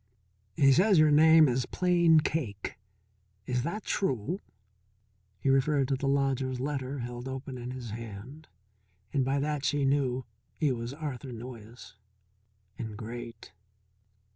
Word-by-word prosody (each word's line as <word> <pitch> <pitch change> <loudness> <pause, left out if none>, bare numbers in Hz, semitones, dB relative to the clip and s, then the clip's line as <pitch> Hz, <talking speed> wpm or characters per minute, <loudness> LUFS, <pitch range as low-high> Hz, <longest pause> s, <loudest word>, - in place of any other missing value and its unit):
"He 135 -1 +5
says 190 +5 +4
your 155 -1 +6
name 160 +1 +7
is 125 0 0
Plain 170 -3 +4
Cake 115 -15 -3 0.7
is 125 -1 0
that 195 - -3
true?" 165 - -1 1.0
He 135 - +2
referred 135 0 +2
to 135 - +2
the 135 +1 -3
lodger's 135 -2 0
letter 135 0 -3
held 120 +1 -6
open 130 0 -6
in 120 +1 -6
his 125 -3 -6
hand, 115 +7 -8 0.7
and 140 -2 +2
by 135 +2 0
that 145 0 -1
she 145 -1 +1
knew 130 -2 +1 0.3
he 150 -4 +1
was 120 -1 -3
Arthur 140 -4 -5
Noyes. 115 0 -10 0.8
And 110 -3 -5
great. 115 0 -8
135 Hz, 135 wpm, -29 LUFS, 120-150 Hz, 1.0 s, name